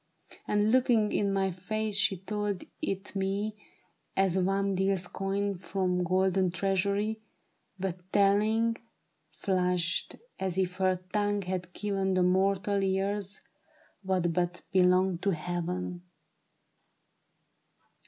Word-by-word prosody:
And 210 +1 +2
looking 240 -4 +3
in 200 -1 +1
my 195 -1 +1
face 210 +4 -3
she 200 -1 +4
told 205 +1 -3 0.2
it 195 +1 -3
me 200 +2 -1 0.6
As 190 -2 +3
one 195 +1 +1
deals 190 -1 +1
coin 200 +2 -1
from 180 0 -1
golden 185 +1 +2
treasury. 200 +4 0 0.6
But 185 -1 -5
telling, 215 +3 +3 0.5
flushed, 180 0 0 0.2
as 190 -1 -2
if 185 -1 0
her 185 -1 +2
tongue 205 -1 +1
had 180 -1 -4
given 195 -2 -1
To 185 - +3
mortal 195 +2 +2
ears 195 +1 -1 0.6
what 185 -3 0
but 175 +1 -1
belonged 185 -1 +4
to 195 -3 +1
heaven. 175 +2 -3
190 Hz, 110 wpm, -29 LUFS, 180-200 Hz, 0.6 s, she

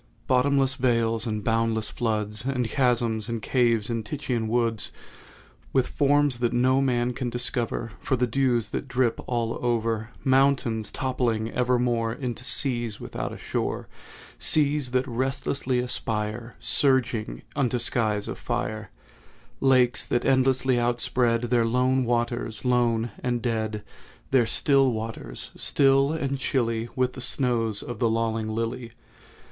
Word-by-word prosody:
Bottomless 135 +1 +2
vales 115 -2 +1
and 105 -2 -2
boundless 115 -1 0
floods, 105 -2 -2
And 125 -2 -1
chasms, 120 -3 +1
and 115 -1 -2
caves, 115 -2 +1
and 115 -2 -2
Titan 120 -1 -3
woods, 115 -2 0 0.8
With 130 -2 +3
forms 145 -3 +2
that 120 -1 0
no 130 +2 +3
man 125 -2 +1
can 125 0 -3
discover 120 -1 -2
For 135 - 0
the 125 0 +1
dews 120 -3 +1
that 135 - -4
drip 125 -2 +1
all 115 -2 -1
over; 115 -2 0
Mountains 130 -5 +2
toppling 120 -4 -1
evermore 120 -2 +1
Into 125 -1 -5
seas 120 -5 0
without - - -5
a - - -7
shore; - - -3 0.5
Seas 145 -3 +3
that 130 +1 0
restlessly 130 +1 -1
aspire, 115 -1 -3
Surging, 120 - +1
unto 125 -3 +1
skies 110 -3 +1
of - - -6
fire; 110 0 -3 0.7
Lakes 130 -2 +3
that 120 - -1
endlessly 130 -1 +3
outspread 120 0 +1
Their 120 -1 +1
lone 130 +2 +2
waters—lone 120 0 0
and 120 -1 -1
dead,— 110 -3 -2 0.5
Their 125 -4 +4
still 135 +2 +3
waters—still 115 - 0
and 140 -4 -2
chilly 115 -3 -1
With 130 -1 +1
the 130 - -8
snows 115 -5 0
of 120 -2 -7
the 115 -3 +2
lolling 110 -1 -1
lily. 115 +1 -3
120 Hz, 130 wpm, -26 LUFS, 115-130 Hz, 0.8 s, Their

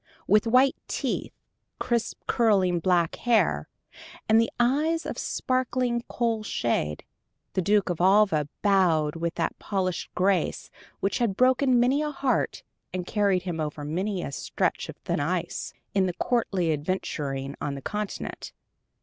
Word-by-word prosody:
With 210 +3 +4
white 255 +3 +5
teeth, - - -3 0.4
crisp 235 -2 -2
curling 195 -7 +3
black 170 -1 +1
hair, 200 - +2 0.6
and 225 +1 +4
eyes 300 +7 +2
of - - -4
sparkling 250 -2 0
coal 230 -2 -1
shade, 115 - -1 0.5
the 185 - +1
Duke 200 0 +2
of 175 - -3
Alva 185 -6 +4
bowed 175 -7 +3
with 170 0 -2
that - - -2
polished 185 -3 -2
grace 185 -2 0 0.3
which 195 - 0
had 220 -5 0
broken 255 0 +4
many 260 +5 +3
a 300 - -1
heart 275 -2 -1 0.3
and 180 -1 -3
carried 200 -2 +1
him 175 -3 -4
over 150 -1 -3
many 185 +5 -2
a - - -4
stretch - - -2
of - - -8
thin - - -2
ice, - - -2 0.2
in 195 -1 +2
the 180 - -2
courtly 190 -8 0
adventuring 145 -4 -3
on 140 -1 -2
the 135 - -7
Continent. 210 -1 -5
195 Hz, 140 wpm, -26 LUFS, 170-235 Hz, 0.6 s, white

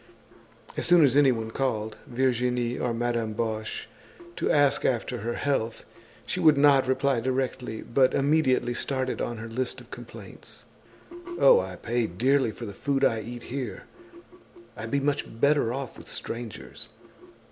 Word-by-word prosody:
As - - 0
soon 175 -3 +7
as 135 -1 +2
anyone 125 -6 +3
called, 110 -4 -2
Virginie 125 -1 0
or 125 - 0
Madame 115 -1 -1
Boche, 110 -1 -3 0.5
to - - -1
ask 145 -2 +3
after 125 0 0
her 120 +2 -3
health, 120 -5 -1 0.4
she - - -3
would 155 -3 +5
not 140 -2 +5
reply 130 -1 +1
directly, 125 -2 -2
but 130 +1 +2
immediately 135 -4 +2
started 130 +1 -2
on 120 - -3
her 115 +1 -6
list 125 +2 -3
of - - -16
complaints: - - -11 0.8
"Oh, - - +7
I - - -4
pay 120 0 -1
dearly 130 +8 +2
for 115 +2 -7
the 100 - -7
food 135 +5 0
I 110 -1 +1
eat 120 +2 -8
here. 130 -3 -5 0.9
I'd 110 0 -6
be 140 - +1
much 140 -5 -2
better 140 -3 +3
off 135 0 -5
with - - -13
strangers. 115 -3 -7
125 Hz, 150 wpm, -27 LUFS, 115-135 Hz, 0.9 s, soon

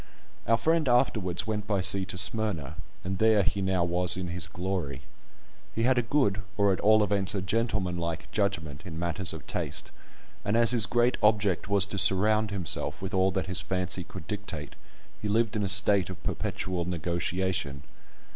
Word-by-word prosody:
Our 115 +1 +4
friend 160 0 +1
afterwards 110 -8 +1
went 105 -1 -3
by 100 -3 +1
sea 95 +1 +5
to 95 -1 -6
Smyrna, 95 -7 +1 0.3
and 95 +1 -4
there 110 -2 +4
he 100 +2 -1
now 95 -2 +1
was 90 +1 +1
in 90 -1 -4
his 90 +1 -2
glory. 90 -8 -4 0.7
He 115 - 0
had 125 +1 +3
a - - +3
good, 115 -6 +1 0.2
or 100 -2 +3
at - - -3
all 110 0 +4
events 100 -1 +1
a 95 - -1
gentleman 95 -3 -1
like, 85 0 -4
judgment 85 -9 -2
in 85 -4 -8
matters 85 +2 0
of 80 - -9
taste, - - -3 0.5
and 105 +3 0
as 115 0 +5
his 115 -5 +4
great 120 +1 +2
object 105 -4 +2
was 100 -2 +3
to 100 0 -3
surround 105 +3 +3
himself 95 -5 -3
with 95 +2 -6
all 95 0 +3
that 95 - -2
his 95 0 -2
fancy 90 -1 0
could 90 +1 -10
dictate, 100 -9 -6 0.5
he 105 - -3
lived 110 +2 +1
in 105 - 0
a 100 - -1
state 100 -2 +4
of 95 - -9
perpetual 90 -2 -3
negotiation. 85 -3 -2
95 Hz, 185 wpm, -28 LUFS, 90-105 Hz, 0.7 s, sea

